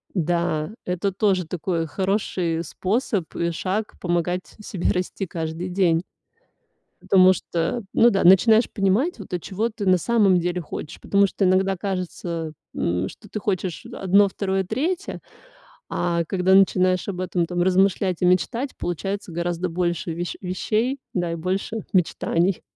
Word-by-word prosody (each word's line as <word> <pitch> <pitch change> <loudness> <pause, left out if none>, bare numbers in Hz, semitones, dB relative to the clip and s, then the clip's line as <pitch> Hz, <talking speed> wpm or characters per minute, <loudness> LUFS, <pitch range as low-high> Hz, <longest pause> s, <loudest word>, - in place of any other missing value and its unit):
Да 170 -2 0
это 180 +2 -1
тоже 190 -2 +1
такой 165 -1 -2
хороший 185 -2 -1
способ 195 - -2
и 170 - 0
шаг 195 +5 -2
помогать 175 +1 -1 0.2
себе 195 -4 -2
расти 185 +2 -2
каждый 165 +1 -4
день. 175 -3 +2 1.0
Потому 185 -1 +5
что, 170 +6 -2
ну 235 - +6
да, 195 -4 +1
начинаешь 220 +6 +6
понимать, 210 - +1
вот, 200 - -10
а 180 - 0
чего 210 +7 -2
ты 210 -2 -6
на 185 -1 +5
самом 200 -1 +3
деле 175 +1 -1
хочешь. 160 0 -7
Потому 200 0 +3
что 195 - -1
иногда 190 +1 +2
кажется, 175 -4 -4 0.2
э, - - -5
м, 90 +2 0
что 210 - -13
ты 215 - -4
хочешь 185 -4 -2
1, 200 +2 +3
2, 190 0 -1
3, 325 - -2 0.7
а 170 -1 0
когда 185 +2 +2
начинаешь 185 -1 +4
об 190 -3 -4
этом 180 -1 0
там 175 0 -1
размышлять 190 0 +2
и - - +3
мечтать, 230 +9 +1
получается 195 +3 -3
гораздо 175 +1 -2
больше 175 0 -1
ве 170 +2 -3 0.2
вещей, 215 +8 -1 0.2
да, 175 -2 0
и - - -2
больше 185 +6 -2 0.2
мечтаний. 180 0 +1
185 Hz, 150 wpm, -23 LUFS, 175-200 Hz, 1.0 s, ну